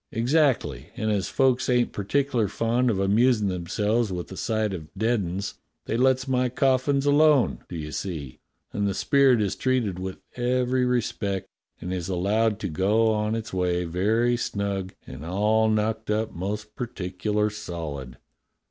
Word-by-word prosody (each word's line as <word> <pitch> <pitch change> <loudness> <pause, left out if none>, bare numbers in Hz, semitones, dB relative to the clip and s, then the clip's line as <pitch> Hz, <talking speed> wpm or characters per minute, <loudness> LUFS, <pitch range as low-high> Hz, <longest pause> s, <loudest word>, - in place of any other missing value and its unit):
"Exactly; 120 - +1
and 110 0 0
as 100 -2 0
folk 130 -2 +2
ain't 125 -1 +2
particular 125 +2 0
fond 115 +5 +1
of 110 - +1
amusin' 105 +2 +3
themselves 105 +5 0
with 90 0 -5
a - - -6
sight 110 0 -1
of 80 -4 -6
dead 115 +3 +2
'uns 95 +3 -4 0.3
they - - -2
lets 130 +1 +2
my 125 -1 +1
cof 130 +1 +2
fins 140 -1 +1
alone, 145 -2 +4
do - - -6
you 75 -2 -5
see, 75 -10 -5 0.3
and 100 0 0
the 100 - -1
spirit 135 -2 +4
is 100 -2 0
treated 115 -6 0
with 95 0 -5 0.2
every 125 +1 +1
respect 105 -5 -1 0.3
and 90 +2 -4
is 90 0 -3
allowed 105 +4 +1
to 105 - -3
go 105 +7 +2
on 105 0 0
its 110 -2 -5
way 90 -1 0
very 110 +8 +1
snug 100 -4 -3
and - - -9
all 105 +6 +2
knocked 110 +1 0
up 110 +1 0
most 105 +4 -5
particular 105 -1 -2
solid." 80 -11 -6
105 Hz, 160 wpm, -25 LUFS, 95-120 Hz, 0.3 s, alone